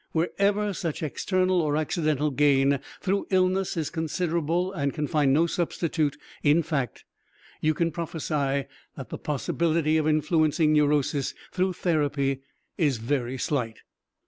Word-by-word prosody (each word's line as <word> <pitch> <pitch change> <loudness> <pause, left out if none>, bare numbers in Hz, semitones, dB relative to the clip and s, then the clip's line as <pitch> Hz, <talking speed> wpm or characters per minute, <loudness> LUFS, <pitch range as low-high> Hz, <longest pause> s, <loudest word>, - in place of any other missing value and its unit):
Wherever 200 +5 +1
such 165 -3 -3
external 185 +4 +1
or 150 -1 0
accidental 155 -2 0
gain 140 0 +3 0.2
through 200 +1 0
illness 185 -1 +1
is 155 -3 -2
considerable 170 +2 -1
and 140 -6 -1
can 150 -1 -1
find 145 -3 +2
no 155 +5 +4
substitute 165 -3 -1 0.2
in 155 +3 +4
fact, 140 -7 -3 0.6
you 155 0 +2
can 170 +1 +1
prophesy 150 -4 -2 0.3
that 135 - -8
the - - -6
possibility 155 +2 0
of 155 -1 +1
influencing 155 0 +2
neurosis 145 -2 +1 0.2
through 185 0 0
therapy 145 -6 0 0.4
is 145 -7 +2
very 125 +2 -2
slight. 120 -5 -2
155 Hz, 130 wpm, -26 LUFS, 145-170 Hz, 0.6 s, no